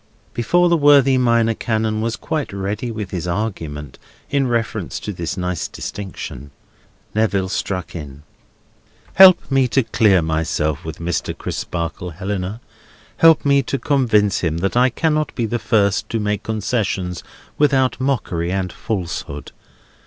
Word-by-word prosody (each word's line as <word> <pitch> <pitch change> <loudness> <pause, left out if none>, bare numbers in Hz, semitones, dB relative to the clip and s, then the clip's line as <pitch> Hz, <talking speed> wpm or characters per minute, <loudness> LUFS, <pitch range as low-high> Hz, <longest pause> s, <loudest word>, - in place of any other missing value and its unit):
Before 175 +10 +2
the 170 -1 +3
worthy 140 -3 +5
Minor 115 -2 +3
Canon 110 -1 -1
was 115 +1 -1
quite 155 -3 -3
ready 100 +4 -3
with 105 -4 -5
his 90 -1 -3
argument 80 - -4 0.3
in 140 -2 +2
reference 115 -5 -2
to 105 - -5
this 85 +1 -4
nice 90 -3 -2
distinction, 95 -7 -7 0.6
Neville 100 -3 +1
struck 90 -3 -3
in: 75 -3 -8 0.9
"Help 185 -5 +7
me 135 -1 +3
to 135 +2 +2
clear 100 -6 +3
myself 80 -1 -1
with 80 -1 -6
Mr. 85 0 -3
Crisparkle, 85 +1 -4
Helena. 100 +4 -4 0.6
Help 165 -2 +5
me 140 -1 +4
to 135 +1 -2
convince 110 -9 +2
him 80 -2 -1
that 95 +5 -1
I 125 +1 +5
cannot 155 +3 0
be 120 - 0
the 120 +2 -2
first 105 -2 +1
to 115 - -1
make 105 -1 -1
concessions 105 -4 -2 0.4
without 135 -3 +2
mockery 95 -11 -1
and 95 -1 -2
falsehood. 90 -8 -4
105 Hz, 140 wpm, -20 LUFS, 90-125 Hz, 0.9 s, Help